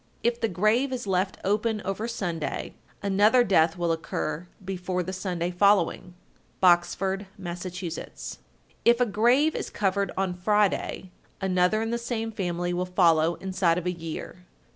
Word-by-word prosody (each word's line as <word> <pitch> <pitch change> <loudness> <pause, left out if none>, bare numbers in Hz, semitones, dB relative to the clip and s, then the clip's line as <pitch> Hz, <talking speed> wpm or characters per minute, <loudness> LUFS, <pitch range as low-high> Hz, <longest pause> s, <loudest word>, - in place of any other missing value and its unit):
If 235 0 +1
the 225 - +2
grave 215 +8 +2
is 255 -3 -3
left 190 0 0
open 215 +2 +1
over 195 +4 -2
Sunday, 175 -9 -3 0.3
another 205 +5 +4
death 175 -5 +3
will 170 -1 0
occur 160 0 -3 0.2
before 180 -1 -2
the 185 +2 -5
Sunday 180 -2 -2
following. 180 -1 +2 0.4
Boxford, 190 +2 +2
Mass. 175 -1 -6
1263. 180 -2 -6 0.4
If 235 +1 +5
a 245 - +4
grave 240 +8 +3
is - - -4
covered 200 0 0
on 190 -1 0
Friday, 195 0 0 0.3
another 185 +3 +2
in 225 - -2
the 235 - -1
same 230 -1 -3
family 175 -3 -2
will 180 +1 -1
follow 170 -3 +3
inside 185 -3 0
of 180 - -3
a 180 - +1
year. 170 +1 -7
190 Hz, 150 wpm, -26 LUFS, 175-210 Hz, 0.4 s, If